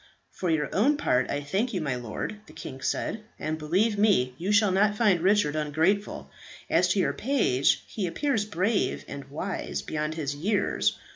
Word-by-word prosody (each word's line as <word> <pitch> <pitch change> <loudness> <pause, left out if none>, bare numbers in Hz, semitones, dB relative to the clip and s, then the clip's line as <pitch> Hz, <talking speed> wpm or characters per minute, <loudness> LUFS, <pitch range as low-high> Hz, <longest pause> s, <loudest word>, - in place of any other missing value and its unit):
"For 180 - -3
your 155 -2 0
own 275 +9 +3
part 130 - +1
I 145 - -1
thank 200 - -1
you, - - 0
my 140 -4 -1
lord," 125 - -5
the - - -14
king 130 - -8
said, 215 +9 -2
"and, 155 +1 -3
believe 195 +8 +1
me, 185 -13 +3
you 185 +4 -1
shall 210 -1 +4
not 205 +2 +3
find 205 -7 +3
Richard 190 -5 +3
ungrateful. 160 +7 0 0.4
As - - +4
to - - +1
your - - +1
page, 215 - +2
he 200 -5 -3
appears 255 - 0
brave 205 +1 0
and 140 0 -7
wise 170 +7 -4
beyond 150 0 -3
his 145 -3 -3
years. 200 +8 0
185 Hz, 180 wpm, -27 LUFS, 150-210 Hz, 0.4 s, shall